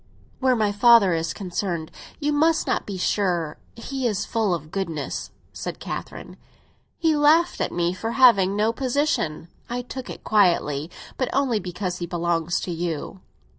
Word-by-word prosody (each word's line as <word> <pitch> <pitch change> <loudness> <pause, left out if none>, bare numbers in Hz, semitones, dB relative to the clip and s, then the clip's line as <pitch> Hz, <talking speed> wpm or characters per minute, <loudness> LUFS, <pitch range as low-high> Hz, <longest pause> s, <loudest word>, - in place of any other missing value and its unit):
"Where 260 -1 +3
my 215 -3 +1
father 205 -3 +6
is 165 0 -1
concerned, 175 -4 -3 0.3
you 295 -1 0
must 320 +2 +3
not - - -1
be 200 -2 -4
sure. 175 -5 0 0.2
He 260 +2 -3
is 210 -4 -1
full 220 -4 0
of 155 -1 -9
goodness," 165 -7 -3 0.2
said - - -6
Catherine. - - -7 0.6
"He 320 -2 +2
laughed 315 +4 +4
at - - 0
me 175 0 0
for 225 +5 -4
having 200 -7 +5
no 215 +2 +2
position! 255 - -1 0.2
I 245 +1 -3
took 260 +1 -7
it - - -8
quietly; 170 -7 +2 0.3
but 255 - -1
only 260 -5 +1
because 180 -1 -4
he 175 - -4
belongs 170 0 0
to 180 - -4
you." 170 +2 -4
200 Hz, 160 wpm, -24 LUFS, 175-250 Hz, 0.6 s, father